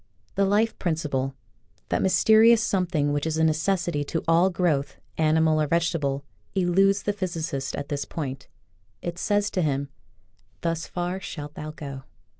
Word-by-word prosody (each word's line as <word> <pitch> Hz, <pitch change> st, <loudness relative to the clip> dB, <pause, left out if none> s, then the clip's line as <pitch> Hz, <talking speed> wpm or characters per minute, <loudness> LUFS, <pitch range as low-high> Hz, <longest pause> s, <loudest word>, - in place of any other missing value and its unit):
The 200 Hz, -, +2 dB
life 210 Hz, +3 st, +1 dB
prin 170 Hz, -4 st, 0 dB
ciple 135 Hz, -4 st, -2 dB, 0.2 s
— -, -, -39 dB
that -, -, +1 dB
mysterious 220 Hz, +4 st, +5 dB
something 175 Hz, -7 st, +1 dB
which 145 Hz, +2 st, -1 dB
is 160 Hz, 0 st, -1 dB
a 160 Hz, -, +2 dB
necessity 160 Hz, 0 st, +1 dB
to 165 Hz, -, -2 dB
all 170 Hz, +3 st, +5 dB
growth, 170 Hz, -6 st, 0 dB, 0.2 s
animal 155 Hz, 0 st, +3 dB
or 150 Hz, -, +1 dB
vegetable, 150 Hz, -4 st, 0 dB, 0.3 s
eludes 195 Hz, +2 st, +3 dB
the 205 Hz, -, 0 dB
physicist 165 Hz, -8 st, -3 dB
at 140 Hz, -, -5 dB
this 145 Hz, -1 st, -2 dB
point. 135 Hz, -4 st, -5 dB, 0.6 s
It 175 Hz, 0 st, -4 dB
says 205 Hz, +2 st, +1 dB
to 185 Hz, -, 0 dB
him: 140 Hz, -3 st, 0 dB, 0.4 s
" 100 Hz, -3 st, -39 dB
Thus 165 Hz, -1 st, -2 dB
far 180 Hz, +1 st, -3 dB
shalt 150 Hz, -6 st, -7 dB
thou 155 Hz, 0 st, -6 dB
go." 140 Hz, -4 st, -7 dB
165 Hz, 165 wpm, -25 LUFS, 145-185 Hz, 0.6 s, mysterious